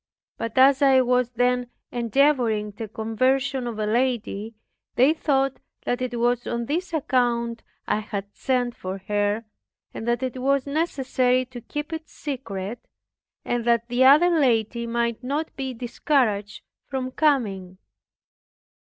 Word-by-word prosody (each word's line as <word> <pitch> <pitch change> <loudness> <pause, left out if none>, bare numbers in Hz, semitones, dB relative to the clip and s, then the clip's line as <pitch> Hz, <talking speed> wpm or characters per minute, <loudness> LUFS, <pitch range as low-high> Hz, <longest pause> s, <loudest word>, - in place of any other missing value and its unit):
But 230 +1 -4
as 270 +1 +6
I 270 -2 +6
was 250 -1 +2
then 245 +1 +1 0.2
endeavoring 235 -3 +2
the 220 +2 -7
conversion 255 +5 0
of 230 -2 -5
a 215 - -1
lady, 225 -2 -1 0.4
they 265 +5 +5
thought 275 -4 0 0.3
that 245 +1 -1
it 245 -2 -2
was 240 0 +1
on 235 0 -2
this 335 +8 -2
account 240 -6 0 0.3
I - - +1
had 205 -1 -6
sent 250 -2 0
for 185 +1 -5
her, 205 +1 0 0.5
and 225 - -6
that 240 +2 +1
it 255 0 -3
was 275 0 +2
necessary 260 -4 +1
to 245 -1 -10
keep 295 +6 -5
it 320 0 -6
secret, 240 -7 -6 0.6
that 235 0 +1
the 245 +2 +3
other 300 +7 +7
lady 235 -6 +1
might 235 0 -1
not 290 +5 -3
be 265 -1 -3
discouraged 235 -4 -1 0.2
from 260 -1 -3
coming. 205 - 0
245 Hz, 135 wpm, -24 LUFS, 230-270 Hz, 0.6 s, other